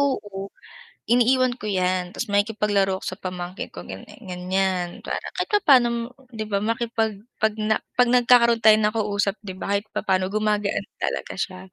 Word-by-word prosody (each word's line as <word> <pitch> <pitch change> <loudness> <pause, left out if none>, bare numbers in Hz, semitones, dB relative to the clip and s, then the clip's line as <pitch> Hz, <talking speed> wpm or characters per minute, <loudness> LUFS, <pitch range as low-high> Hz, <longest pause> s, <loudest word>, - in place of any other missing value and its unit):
oo 205 -8 -2 0.6
iniiwan 250 +1 +4
ko 245 - -10
yan 185 -2 0
ta's - - -4
makikipag-laro 205 -2 +1
ako - - -15
sa - - -30
pamangkin 180 0 -5
ko - - -8
ganyan 95 0 -10
ganyan 185 0 -1
para - - -3
kahit - - -2
papaano 240 - +3 0.2
'di 220 - -3
ba 200 - +2
makipag 225 0 -1 0.3
'pag 220 -1 +2
na 215 0 +1 0.2
'pag 250 0 +5
nagkakaroon 240 -1 +5
tayo 215 0 +8
ng 210 0 +2
kausap 205 -2 0
'di 190 -3 -7
ba 195 - -4
kahit 205 +2 -2
papaano 185 -2 +1
gumagaan 210 -1 0 0.2
talaga - - -2
siya? 185 -2 -3
210 Hz, 165 wpm, -24 LUFS, 190-230 Hz, 0.6 s, tayo